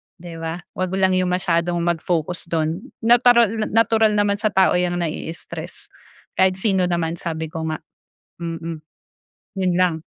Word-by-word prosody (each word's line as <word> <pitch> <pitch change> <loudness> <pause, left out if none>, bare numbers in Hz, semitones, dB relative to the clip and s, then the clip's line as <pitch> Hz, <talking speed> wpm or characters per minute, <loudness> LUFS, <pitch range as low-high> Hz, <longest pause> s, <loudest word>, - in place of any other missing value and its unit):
di 170 -1 -10
ba 165 +2 -4 0.2
'wag 185 0 -2
lang 190 -1 +3
yung 180 -1 +1
masyadong 175 -1 0
mag-focus 170 0 -1
do'n. 160 0 -1 0.2
Natural 235 -2 +4
natural 220 -1 +3
naman 205 -1 +2
sa 215 - +1
tao 190 -2 +4
'yang 175 0 0
nai-stress, 165 0 -6 0.5
kahit 190 0 +4
sino 190 -2 +1
naman 170 -1 -1
sabi 160 -1 -4
ko 160 0 -4
nga. 155 -1 -3 0.6
Mm. 165 -1 -5 0.8
Yun 180 -2 +1
lang. 180 -2 +3
180 Hz, 145 wpm, -21 LUFS, 165-195 Hz, 0.8 s, Natural